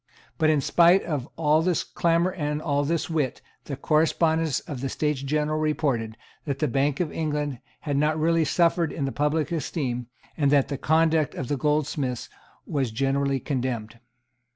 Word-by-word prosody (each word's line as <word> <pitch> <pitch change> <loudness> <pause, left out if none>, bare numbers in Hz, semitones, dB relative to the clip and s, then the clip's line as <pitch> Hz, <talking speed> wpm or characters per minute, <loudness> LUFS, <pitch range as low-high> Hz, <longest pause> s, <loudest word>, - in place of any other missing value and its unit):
But, 155 - +4
in 150 -2 +3
spite 175 +6 +5
of 145 -5 -3
all 155 0 +3
this 175 -1 +1
clamour 170 +2 +1
and 150 -4 -2
all 145 -2 0
this 165 +3 -1
wit, 150 -6 -1 0.3
the 140 - -4
correspondents 160 -1 +2
of 140 -7 -7
the 135 - -2
States 150 -2 -1
General 150 +2 0
reported, 135 -8 -1 0.3
that 140 -3 -2
the 150 - 0
Bank 140 +2 0
of 175 -4 -1
England 150 -4 -2 0.2
had 145 -2 -2
not 150 +2 +2
really 165 +1 +3
suffered 170 +1 +2
in 140 - -3
the 135 - -2
public 150 +2 0
esteem, 130 -7 -2 0.3
and 145 -2 +2
that 140 -1 +3
the 140 - -2
conduct 160 -1 +2
of 130 - -5
the 145 - +1
goldsmiths 145 -2 -1 0.4
was 135 -4 -1
generally 135 +3 0
condemned. 120 -5 -3
150 Hz, 170 wpm, -25 LUFS, 135-160 Hz, 0.4 s, spite